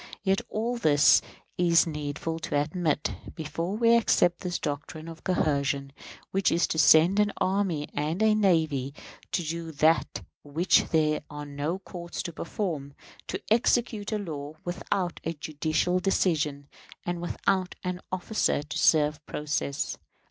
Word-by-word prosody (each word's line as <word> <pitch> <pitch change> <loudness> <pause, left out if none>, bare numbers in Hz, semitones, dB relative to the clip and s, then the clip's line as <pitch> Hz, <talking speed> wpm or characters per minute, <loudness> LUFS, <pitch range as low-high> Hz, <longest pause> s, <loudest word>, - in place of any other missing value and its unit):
Yet 195 -1 +2
all 235 +3 -2
this 145 -9 +5 0.4
it - - +3
is 170 -1 +5
needful 150 +1 -4
to 155 -2 -1
admit, 150 0 -1 0.2
before 165 +5 -3
we 230 0 +5
accept 175 -6 +3
this 180 -1 -2
doctrine 150 +2 -5
of 165 -1 -10
coercion, 140 -5 0 0.4
which 195 -1 +2
is 170 - +3
to 160 - -1
send 165 +6 +6
an 210 -1 +3
army 185 -6 0
and 155 +7 -1
a 220 -1 +5
navy 160 -9 +1 0.4
to 175 - 0
do 165 +1 -4
that 155 +2 +2 0.2
which 155 +6 +2
there 155 -1 +1
are 150 0 -7
no 145 +5 -3
courts 175 -2 -7
to 170 - -5
perform; 160 -6 -4 0.3
to - - -3
execute 225 -2 +2
the 215 - -1
law 155 -6 -6
without 180 0 -2
a 165 - -2
judicial 155 +3 0
decision, 150 -7 0 0.4
and 175 -1 -2
without 185 +1 -1
an 180 0 -3
officer 185 -4 0
to 150 - -5
serve 150 -1 +3
process. 150 -1 -2
165 Hz, 145 wpm, -27 LUFS, 150-185 Hz, 0.4 s, send